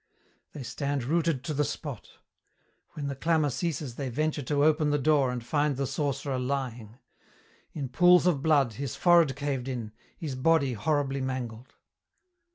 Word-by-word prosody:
They 145 - -7
stand 140 +2 -2
rooted 160 -1 0
to 155 - -3
the 150 +1 +1
spot. 145 -4 -6 0.8
When 145 - -5
the 140 -1 -3
clamour 155 0 +1
ceases 145 -4 -3
they 135 -2 -3
venture 155 +4 -1
to 145 +2 0
open 155 0 +3
the 145 - +2
door 145 -2 +3
and 125 -1 -4
find 145 +2 0
the 140 - 0
sorcerer 140 -1 -2
lying; 125 -4 -4 0.8
in 140 -3 -4
pools 180 +7 +5
of 165 -7 +2
blood, 140 -6 +3
his 135 +1 -5
forehead 170 -6 +4
caved 140 -3 -3
in, 120 -5 -4 0.3
his 155 -5 -4
body 140 0 +2
horribly 140 +3 0
mangled. 125 -2 -5
140 Hz, 160 wpm, -28 LUFS, 130-150 Hz, 0.8 s, pools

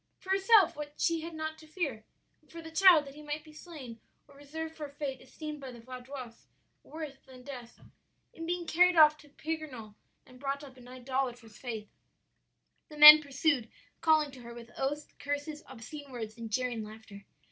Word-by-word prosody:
"For 380 - -7
herself 390 0 +5
what 295 0 -5
had 295 - -26
she 330 -1 0
not 315 -1 -5
to 315 - -15
fear! 300 -10 -3 0.4
and 300 -3 -25
for 335 - -9
the 325 -1 -9
child 340 -3 +7
that 275 - -10
he 300 - -12
might 300 0 -5
be 310 0 -15
slain 295 -8 -10 0.3
or 280 - -19
reserved 320 +3 -7
for 300 -2 -6
a - - -16
fate 280 -2 -5
esteemed 305 -2 -8
by 265 -1 -7
the 240 - -11
Vaudois 250 0 -9 0.3
worse 305 -4 -8
than 255 -1 -13
death, 245 -3 -9 0.5
in 330 0 -7
being 350 0 -2
carried 360 +2 +4
off 305 -2 +8
to 295 - -17
Pignerol 285 -9 -6 0.3
and 255 -1 -16
brought 280 +1 -3
up 270 -2 -12
in 250 -1 -15
an 250 - -11
idolatrous 250 -3 -3
faith. 225 -4 -5 1.0
"The 300 - -11
men 300 +1 +12
pursued, 280 -3 0 0.3
calling 310 -3 +3
to 260 -2 -12
her 235 0 -10
with 235 0 -11
oaths, 290 +3 -2
curses, 290 +1 -4
obscene 270 +3 -10
words, 220 -3 -6
and 230 -1 -7
jeering 245 -1 -1
laughter. 215 -1 -11
285 Hz, 190 wpm, -31 LUFS, 250-315 Hz, 1.0 s, men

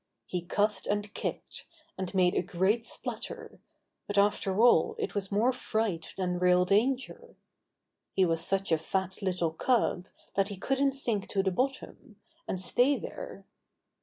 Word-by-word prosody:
He 180 - -3
coughed 205 +3 0
and 205 0 -1
kicked, - - -5 0.3
and 190 -1 -4
made 180 -1 +4
a - - +2
great 190 +6 0
splutter, 460 -2 -4 0.5
but 205 - -3
after 200 -1 +2
all 245 - +5
it 445 - -3
was 200 -1 -2
more 225 +6 +3
fright 215 -9 -2
than 180 -2 -1
real 180 0 +4
danger. 255 - 0 0.8
He 190 - +4
was 165 -1 +1
such 195 +1 0
a 160 - +3
fat 190 +4 -3
little 180 -4 0
cub 185 -1 +1 0.3
that 195 0 +2
he 200 - -6
couldn't 270 +6 +1
sink 230 -7 0
to 195 -2 0
the 190 - +1
bottom, 255 -1 -3 0.3
and 185 - -2
stay 245 +9 +2
there. - - -8
200 Hz, 155 wpm, -29 LUFS, 185-245 Hz, 0.8 s, all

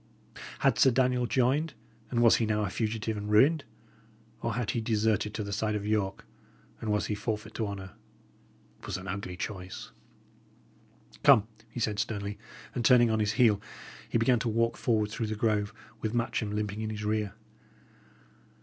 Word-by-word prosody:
Had - - +3
Sir 135 - +7
Daniel 125 -1 +2
joined, 135 +6 +1 0.3
and 120 -1 +1
was 115 - +7
he 115 - 0
now 105 0 +1
a 90 - -3
fugitive 110 0 -2
and 105 0 -5
ruined? 140 +9 +4 0.8
or 115 -2 -1
had 120 -2 -1
he 115 - -1
deserted 110 -2 +1
to 105 - -2
the 100 0 -4
side 105 +1 0
of 105 -1 -3
York, 105 -2 -1 0.5
and 110 - -2
was 105 0 +1
he - - -2
forfeit 105 0 -3
to 110 - -2
honour? 95 -2 -6 0.9
It - - -11
was - - -2
an 95 0 -8
ugly 95 -2 -4
choice. 90 -2 -6 1.3
"Come," 110 0 +6 0.2
he 120 - -7
said, 105 -2 0
sternly; 100 -1 -3 0.3
and, 120 - -2
turning 120 -1 +6
on 110 - +1
his 105 0 +1
heel, 105 -3 +4 0.5
he - - +2
began 115 +1 +3
to 115 - -1
walk 115 +1 +1
forward 110 -3 +1
through 110 0 -2
the 110 - -2
grove, 105 -1 +1 0.3
with 110 +1 -2
Matcham 115 -2 0
limping 105 0 -2
in 110 - -2
his 105 -1 -4
rear. 105 -1 -1
110 Hz, 175 wpm, -29 LUFS, 105-115 Hz, 1.3 s, Sir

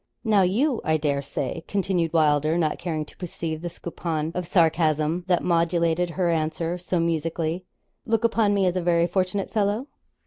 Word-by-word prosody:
'Now, 215 -4 +4
you, 230 +8 +1
I 155 0 +2
dare 145 -2 0
say,' 140 +3 -4
continued 185 -4 0
Wylder, 155 0 +3
not 155 -3 0
caring 155 -3 -3
to - - -18
perceive 165 -3 -4
the 175 - -4
soupçon 165 -2 -4
of 180 -1 -3
sarcasm 160 -1 +2
that 180 -1 +2
modulated 170 0 +1
her 175 0 0
answer 165 +2 -1
so 180 0 -1
musically, 165 +1 -1 0.4
'look 225 0 +1
upon 225 -3 +2
me 195 -1 +2
as 180 0 +1
a 185 - 0
very 170 -1 +3
fortunate 185 +2 -1
fellow?' 210 +3 0
170 Hz, 170 wpm, -25 LUFS, 160-185 Hz, 0.4 s, Now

